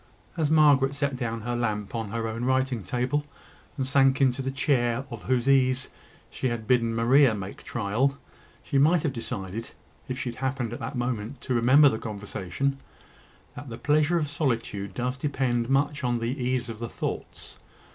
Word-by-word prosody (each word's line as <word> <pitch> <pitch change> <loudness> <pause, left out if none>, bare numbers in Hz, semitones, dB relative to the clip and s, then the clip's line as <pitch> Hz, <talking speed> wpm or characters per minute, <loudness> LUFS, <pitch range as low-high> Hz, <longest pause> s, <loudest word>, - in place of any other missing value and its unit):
As 160 -4 0
Margaret 145 -3 +5
set 140 -1 -1
down 115 -3 -3
her 120 +2 -2
lamp 105 -4 -2
on 115 -3 -3
her 115 +1 -2
own 115 +2 -4
writing 130 -2 +1
table, 125 +7 -1 0.5
and 135 - -1
sank 135 +1 +3
into 135 -1 +2
the 135 - -2
chair 135 -3 +1
of 115 -2 -6
whose 130 0 +1
ease 130 -1 +3 0.4
she 130 - -2
had 120 -2 -3
bidden 115 -1 +2
Maria 120 +1 +5
make 100 -1 -7
trial, 120 +6 0 0.5
she 140 - +1
might 160 +3 +4
have 145 - 0
decided, 110 -2 -5 0.4
if 130 - -4
she 130 - -3
had 120 - -13
happened 130 -3 -2
at - - -6
the - - -4
moment 120 0 -3
to 130 - -2
remember 130 +5 +6
the 110 -5 +1
conversation, 105 +5 -3 0.8
that 145 - -8
the 115 - -6
pleasure 155 +5 +2
of 155 -3 0
solitude 115 -9 -2
does 125 +2 -2
depend 130 -4 0
much 140 +1 +1
on 120 -1 +1
the 115 +3 -2
ease 125 0 0
of 115 -2 -7
the 115 -1 -4
thoughts. - - -6
125 Hz, 180 wpm, -26 LUFS, 115-140 Hz, 0.8 s, remember